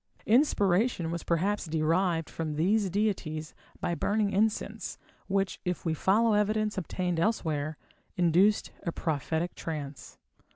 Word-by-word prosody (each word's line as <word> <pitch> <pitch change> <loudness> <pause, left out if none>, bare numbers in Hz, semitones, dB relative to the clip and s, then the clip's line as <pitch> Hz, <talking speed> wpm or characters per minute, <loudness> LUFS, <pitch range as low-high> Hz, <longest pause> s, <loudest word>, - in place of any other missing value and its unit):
Inspiration 205 - +3
was 170 0 -3
perhaps 185 +3 0
derived 165 +1 +1
from 155 -2 -4
these 195 +6 +2
deities 175 -6 -1 0.3
by 175 - -1
burning 205 +3 +1
incense, 215 +2 -1 0.3
which, 195 -1 0
if 180 -1 -3
we 165 - +1
follow 215 +7 +3
evidence 210 +1 +1
obtained 180 -2 -2
elsewhere, 155 -7 0 0.4
induced 180 +4 +3
a 170 - -2
prophetic 160 +2 -2
trance. 150 -4 -6
180 Hz, 120 wpm, -29 LUFS, 160-205 Hz, 0.4 s, Inspiration